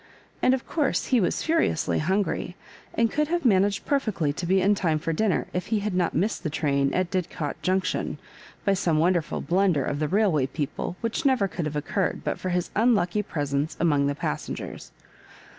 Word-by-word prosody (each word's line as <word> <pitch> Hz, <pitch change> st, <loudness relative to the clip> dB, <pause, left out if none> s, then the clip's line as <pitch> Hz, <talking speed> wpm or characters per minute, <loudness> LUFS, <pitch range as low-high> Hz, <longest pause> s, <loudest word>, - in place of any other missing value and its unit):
And 255 Hz, -, +4 dB
of 260 Hz, -, -7 dB
course 295 Hz, -4 st, 0 dB
he 250 Hz, -4 st, +3 dB
was 180 Hz, -, 0 dB
furiously 320 Hz, -, +1 dB
hungry, 185 Hz, +1 st, -1 dB, 0.4 s
2 -, -, 0 dB
and 230 Hz, -, +3 dB
could 300 Hz, 0 st, +1 dB
have 345 Hz, -1 st, -1 dB
managed 200 Hz, -2 st, +3 dB
perfectly 215 Hz, -, 0 dB
to 170 Hz, +3 st, -4 dB
be 190 Hz, +2 st, +4 dB
in 200 Hz, +2 st, +4 dB
time 170 Hz, -6 st, +1 dB
for 165 Hz, +1 st, -2 dB
dinner 205 Hz, +3 st, +1 dB
if 180 Hz, -, -2 dB
he 220 Hz, -2 st, 0 dB
had 210 Hz, -1 st, -2 dB
not 180 Hz, -2 st, 0 dB
missed 200 Hz, +8 st, 0 dB
the 165 Hz, -, -2 dB
train 140 Hz, -3 st, +1 dB
at 185 Hz, -1 st, 0 dB
Didcot 170 Hz, -5 st, -3 dB
Junction, 185 Hz, 0 st, 0 dB, 0.5 s
by 200 Hz, -, +4 dB
some 175 Hz, -5 st, +1 dB
wonderful 170 Hz, 0 st, +1 dB
blunder 180 Hz, -5 st, +2 dB
of 145 Hz, -, -2 dB
the 155 Hz, -, 0 dB
railway 180 Hz, -8 st, +2 dB
people, 150 Hz, +4 st, -4 dB
which 230 Hz, +7 st, -2 dB
never 260 Hz, -8 st, +3 dB
could 175 Hz, -3 st, -4 dB
have 150 Hz, 0 st, -3 dB
occurred 170 Hz, +6 st, -1 dB
but -, -, -2 dB
for 185 Hz, -, -3 dB
his 180 Hz, -1 st, -1 dB
unlucky 210 Hz, -4 st, +3 dB
presence 145 Hz, -4 st, -2 dB
among 145 Hz, -4 st, +3 dB
the 140 Hz, -, -1 dB
passen 75 Hz, -, -3 dB
gers. -, -, -8 dB
180 Hz, 195 wpm, -26 LUFS, 155-210 Hz, 0.5 s, And